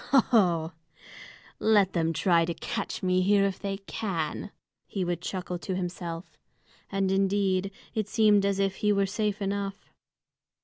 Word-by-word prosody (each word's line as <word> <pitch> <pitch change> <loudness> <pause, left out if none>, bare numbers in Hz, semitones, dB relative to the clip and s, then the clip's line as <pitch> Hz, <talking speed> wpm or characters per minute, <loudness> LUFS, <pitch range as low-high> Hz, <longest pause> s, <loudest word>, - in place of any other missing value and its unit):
"Ho, 275 - +7
ho! 175 -8 +3 0.9
Let 205 -3 +4
them 165 -2 +1
try 165 +1 +3
to 170 0 -3
catch 220 -5 -4
me 185 0 +3
here, 200 +1 +4
if 195 -1 -2
they 195 -1 -3
can!" 190 -2 -3 0.4
he 190 -3 -2
would 175 -1 -2
chuckle 180 -1 -4
to 185 +1 -3
himself. 175 -1 -5 0.5
And 195 -1 +1
indeed, 195 -1 +1 0.2
it 215 -2 -1
seemed 210 -2 +4
as 200 -1 +1
if 195 -1 0
he 210 - +2
were 200 -1 +3
safe 210 +1 -1
enough. 200 0 -3
195 Hz, 150 wpm, -28 LUFS, 180-200 Hz, 0.9 s, Ho